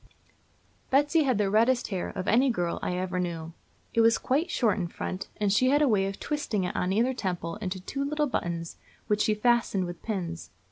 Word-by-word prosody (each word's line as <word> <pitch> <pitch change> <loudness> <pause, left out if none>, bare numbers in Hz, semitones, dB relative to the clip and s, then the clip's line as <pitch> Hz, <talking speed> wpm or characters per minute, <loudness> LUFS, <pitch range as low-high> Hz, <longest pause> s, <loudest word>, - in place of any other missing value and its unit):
Betsy 290 +3 +3
had 255 -5 +2
the 205 -1 +2
reddest 235 +4 +3
hair 190 -4 -2
of 185 -1 -5
any 255 +4 +4
girl 175 -8 -1
I 180 - -2
ever 185 0 -2
knew. 165 -2 -4 0.4
It 230 - +4
was 225 0 +5
quite 295 +7 0
short 225 -9 +1
in 175 - -1
front, 185 +2 -5
and 205 -2 +1
she 255 +4 +4
had 290 +2 +4
a - - +4
way 200 -5 +2
of 195 - -6
twisting 290 -10 -2
it, 180 - -3
on 180 - 0
either 235 +6 +2
temple, 180 -5 -3
into 190 -3 -4
two 275 +9 -4
little 300 +1 0
buttons, 170 - -3 0.3
which 210 0 +1
she 215 - +2
fastened 225 -4 +2
with 175 -1 -7
pins. 175 -6 -4
210 Hz, 205 wpm, -28 LUFS, 180-255 Hz, 0.4 s, was